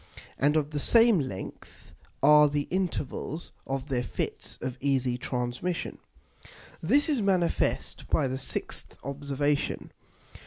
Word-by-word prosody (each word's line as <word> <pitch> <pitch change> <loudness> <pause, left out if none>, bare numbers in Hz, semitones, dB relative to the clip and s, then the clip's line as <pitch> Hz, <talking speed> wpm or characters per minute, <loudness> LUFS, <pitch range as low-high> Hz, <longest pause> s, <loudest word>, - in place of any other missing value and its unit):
And 145 +3 +4
of 150 -1 0
the 150 - -2
same 230 - +5
length 100 -10 -7 0.3
are 150 0 +8
the 145 0 -1
Intervals 170 -3 -2 0.2
of 135 +1 -3
their 125 -2 +1
Fits 125 - -4
of 130 -1 -4
easy 130 -3 +1
Transmission._ 125 +7 -3 0.8
This 275 - +3
is 290 -7 +1
manifest 185 -4 0
by - - +3
the 130 +1 -2
6th 130 - -4
Observation. 140 +1 -1
145 Hz, 120 wpm, -28 LUFS, 130-170 Hz, 0.8 s, are